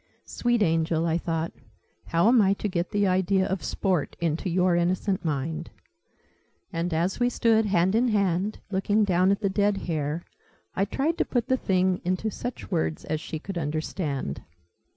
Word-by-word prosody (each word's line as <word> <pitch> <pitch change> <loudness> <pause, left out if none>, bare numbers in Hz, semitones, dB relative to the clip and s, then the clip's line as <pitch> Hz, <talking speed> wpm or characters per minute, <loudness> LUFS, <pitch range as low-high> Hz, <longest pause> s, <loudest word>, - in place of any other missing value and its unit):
"Sweet 240 -2 +1
angel!" 165 -1 +1
I 165 0 +1
thought. 165 -1 -2 0.5
"How 170 +4 +2
am 240 -1 +6
I 195 -1 +4
to 205 - -3
get 175 -2 -2
the 205 0 +1
idea 190 +1 +2
of 190 -1 -2
Sport 185 -7 -1
into 170 +3 -1
your 180 0 +2
innocent 185 +3 0
mind?" 155 +1 -2 1.0
And 170 +2 -1
as 170 +6 0
we 245 0 +3
stood, 225 -2 +2
hand 185 -1 +2
in 235 +3 +3
hand, 200 -2 +1
looking 205 +3 +2
down 185 -1 +3
at 200 +1 +1
the 200 - +2
dead 200 +1 +1
hare, 155 0 -2 0.5
I 195 - +2
tried 300 - -1
to - - +4
put 245 0 -1
the 260 - +4
thing 185 -4 +1
into 185 +5 -1
such 245 -2 -6
words 160 -2 -1
as 155 -1 -2
she 160 - -5
could 175 +3 -5
understand. 150 - -3
185 Hz, 170 wpm, -26 LUFS, 165-205 Hz, 1.0 s, am